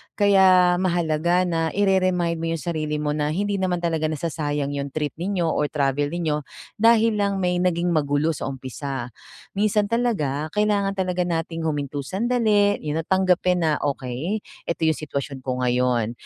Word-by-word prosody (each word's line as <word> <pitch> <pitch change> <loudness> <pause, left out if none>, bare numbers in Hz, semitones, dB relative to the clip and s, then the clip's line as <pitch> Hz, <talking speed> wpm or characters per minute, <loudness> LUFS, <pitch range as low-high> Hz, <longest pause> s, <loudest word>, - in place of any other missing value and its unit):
Kaya 190 -3 +5
mahalaga 175 -1 +1
na 165 -2 0
ire-remind 185 -4 +1
mo 165 - -2
yung 165 - -2
sarili 155 0 -2
mo 150 -1 -1
na 150 0 0
hindi 205 +1 -1
naman 180 -2 0
talaga 160 -2 0
nasasayang 145 -2 -2
yung 140 0 -3
trip 150 0 -2
ninyo 180 +1 -2
or 150 -2 +1
travel 145 -1 0
ninyo, 160 -3 -1 0.4
dahil 230 0 +4
lang 200 -1 0
may 180 -1 0
naging 175 -1 +1
magulo 145 +1 +1
sa - - -4
umpisa. 130 -1 -5 0.5
Minsan 210 0 +2
talaga, 155 - 0
kailangan 205 -2 +1
talaga 180 -1 0
nating 165 -1 -3
huminto 145 -1 -2
sandali, 205 - +1
yun 150 +1 -2
na - - -3
tanggapin 185 -1 +2
na, 155 -2 +2
"okey, 140 - -2 0.3
eto 170 0 -2
yung 160 - +2
sitwasyon 140 -2 -4
ko 130 -1 -2
ngayon." 125 -2 +1
165 Hz, 160 wpm, -23 LUFS, 145-190 Hz, 0.5 s, Kaya